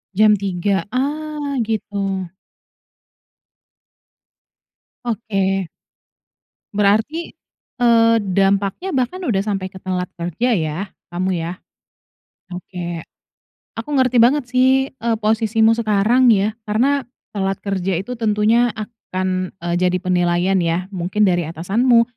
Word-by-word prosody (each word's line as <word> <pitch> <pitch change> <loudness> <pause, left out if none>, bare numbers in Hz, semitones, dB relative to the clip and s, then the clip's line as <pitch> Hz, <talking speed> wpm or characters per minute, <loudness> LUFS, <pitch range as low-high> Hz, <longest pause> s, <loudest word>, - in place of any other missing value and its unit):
Jam 215 +1 +6
3.00, 195 -1 -1
ah, 290 +1 -2
gitu? 200 -3 -2 2.8
Oke. 195 -5 -1 1.1
Berarti, 220 +12 +1 0.5
eee, 230 -1 +5
dampaknya 195 - 0
bahkan 275 +7 -1
udah 220 - +1
sampai 195 -3 -3
ke 190 - -11
telat 180 -1 -3
kerja 175 +9 -1
ya, 155 -2 -2 0.3
kamu, 185 0 -1
ya. 165 +2 -3 1.0
Oke, 175 -2 -6 0.8
aku - - -7
ngerti 255 -2 +3
banget 260 +5 +5
sih, 260 +1 +3
eee, 235 -3 -1
posisimu 220 +1 +3
sekarang 225 +3 +3
ya. 210 +1 +1
Karena, 265 +7 +2 0.3
telat 195 -1 -1
kerja 190 -3 -1
itu, 245 +7 -5
tentunya 225 +2 +2
akan, 185 -4 -3
eee, 175 0 -1
jadi 180 0 +2
penilaian 180 +1 +1
ya, 170 +2 -1
mungkin 185 +3 0
dari 175 -2 +2
atasanmu, 220 +9 +3
205 Hz, 105 wpm, -20 LUFS, 185-235 Hz, 2.8 s, Jam